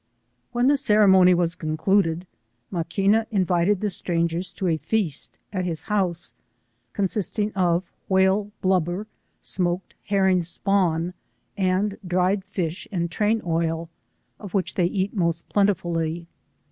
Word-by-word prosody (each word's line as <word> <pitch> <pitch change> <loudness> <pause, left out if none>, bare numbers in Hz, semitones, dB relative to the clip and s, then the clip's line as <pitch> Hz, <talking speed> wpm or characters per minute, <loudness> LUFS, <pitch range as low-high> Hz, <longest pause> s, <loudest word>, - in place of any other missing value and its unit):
When 240 +1 +1
the 285 +2 +4
ceremony 190 -7 +5
was 170 -1 +1
concluded, 165 +1 0 0.5
Maqufba 200 +5 +1
invited 185 -2 +1
the 210 -1 0
strangers 170 0 -1
to 190 - -4
a 165 -3 +2
feast 160 -1 -2 0.2
at 185 -2 -1
his 165 -3 -3
house, 180 - -1 0.6
cod 200 - 0
sisting 210 +2 0
of 180 -1 +1 0.2
whale 190 +2 +3
blubber, 185 +1 +1 0.4
smoked 180 0 -2
herring 190 -2 +3
spawn, 175 -1 0 0.4
and 195 +1 0
dried 185 +2 +1
fish 180 -3 -4
and 170 -3 -2
train 215 +4 +1
oil, 165 0 -1 0.5
of 200 -2 -7
which 190 - 0
they 175 -2 +2
eat 195 +3 -2
most 170 -3 -1
plentifully. 170 -5 0
185 Hz, 125 wpm, -24 LUFS, 170-200 Hz, 0.6 s, ceremony